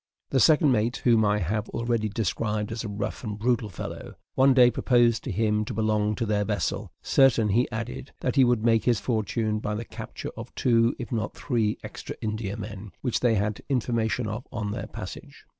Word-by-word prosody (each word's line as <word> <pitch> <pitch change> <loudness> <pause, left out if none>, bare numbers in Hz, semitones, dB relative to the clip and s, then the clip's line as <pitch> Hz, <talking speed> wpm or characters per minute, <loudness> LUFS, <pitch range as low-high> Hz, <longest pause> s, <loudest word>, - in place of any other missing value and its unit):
The 135 - +3
second 150 +2 +5
mate, 120 +2 +1
whom 115 -3 +5
I 105 0 +3
have 105 +4 -2
already 115 -2 -1
described 105 0 -2
as 115 0 -4
a - - -4
rough 100 +4 -4
and 105 -3 -4
brutal 115 -1 0
fellow, 90 - -7 0.2
one 135 0 +5
day 125 -2 +7
proposed 120 -3 +3
to 130 - -2
him 105 +1 +1
to - - -5
belong 105 -1 +1
to 115 - -2
their 105 -1 +1
vessel, - - -2
certain, 125 -5 +4
he 120 +5 +2
added, 120 +3 -5
that 125 - -1
he 135 - +6
would 120 -3 +2
make 115 -2 +3
his 120 -4 +3
fortune 110 -1 -1
by 105 0 -3
the 115 +2 -4
capture - - -7
of - - -9
two, 115 -1 +3
if 120 - -7
not 110 -3 -2
three, 115 -6 0
extra - - -7
Indiamen, 105 -1 -5
which 120 -4 0
they 120 -1 +3
had 105 +1 -1
information 120 -2 0
of 110 +4 -5
on 110 -4 -3
their - - -4
passage. - - -9
110 Hz, 195 wpm, -26 LUFS, 105-120 Hz, 0.2 s, day